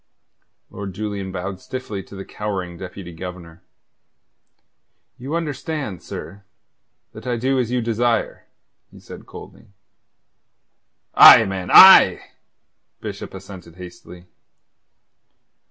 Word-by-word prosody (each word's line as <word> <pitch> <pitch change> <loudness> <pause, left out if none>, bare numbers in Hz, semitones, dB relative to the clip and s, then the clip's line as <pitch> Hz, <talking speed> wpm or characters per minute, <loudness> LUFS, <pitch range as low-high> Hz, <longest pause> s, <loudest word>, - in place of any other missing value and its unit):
Lord 100 -2 -8
Julian 100 -2 -5
bowed 95 +1 -6
stiffly 130 -7 -7
to 100 - -15
the 95 - -9
cowering 95 -4 -6
Deputy 90 0 -10
Governor. 85 -1 -10 1.6
"You 135 +6 -5
understand, 150 - -5
sir, 100 +1 -10 0.7
that - - -11
I 120 -1 -2
do 130 +3 -1
as 120 -3 -2
you 125 0 -1
desire," 115 0 -2 0.4
he - - -17
said - - -13
coldly. - - -14 1.5
"Aye, 110 - +9
man, 95 -2 -6
aye!" 190 - +7 0.7
Bishop - - -8
assented 95 -3 -12
hastily. 90 0 -13
100 Hz, 105 wpm, -20 LUFS, 90-120 Hz, 1.6 s, Aye